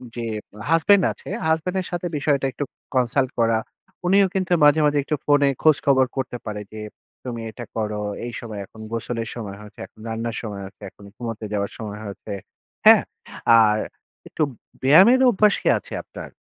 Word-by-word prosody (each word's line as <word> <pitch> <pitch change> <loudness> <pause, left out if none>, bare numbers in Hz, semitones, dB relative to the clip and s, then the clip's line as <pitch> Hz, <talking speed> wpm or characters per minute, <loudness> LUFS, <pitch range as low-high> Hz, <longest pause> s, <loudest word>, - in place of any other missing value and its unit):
যে 120 -1 -4 0.5
husband 185 +4 +5
আছে, - - -10 0.2
husband 160 +3 0
এর - - -7
সাথে 175 0 -2
বিষয়টা 140 -1 +1
একটু 145 - -3 0.3
consult 130 +1 +2
করা। 115 -1 +3 0.5
উনিও 195 +1 +5
কিন্তু 185 -1 0
মাঝে, 150 +2 +6
মাঝে 145 0 +2
একটু 150 +2 -1
ফোনে 145 -1 +4 0.2
খোঁজখবর 140 -4 +4
করতে 125 -1 -2
পারে 105 -1 -4
যে 110 - -7 0.5
তুমি 115 -2 -4
এটা 120 +2 -8
করো। 105 -1 -2 0.2
এই 120 - -6
সময় 110 -3 -7
এখন 110 +3 -15
গোসলের 115 0 -3
সময় 100 -4 -6
হয়েছে, 105 - -14
এখন - - -26
রান্নার 115 +1 -3
সময় 105 -3 -6
হয়েছে। 95 0 -14
এখন 100 - -16
ঘুমোতে 115 -2 -5
যাওয়ার 100 -1 -1
সময় 105 -1 -6
হয়েছে। 100 +1 -7 0.5
হ্যাঁ? - - +8 0.6
আর 105 -1 +4 0.5
একটু 155 - -1 0.4
ব্যায়ামের 190 - +7
অভ্যাস 210 -1 +4
কি - - -3
আছে - - -10
আপনার? - - -10
120 Hz, 170 wpm, -23 LUFS, 110-150 Hz, 0.6 s, হ্যাঁ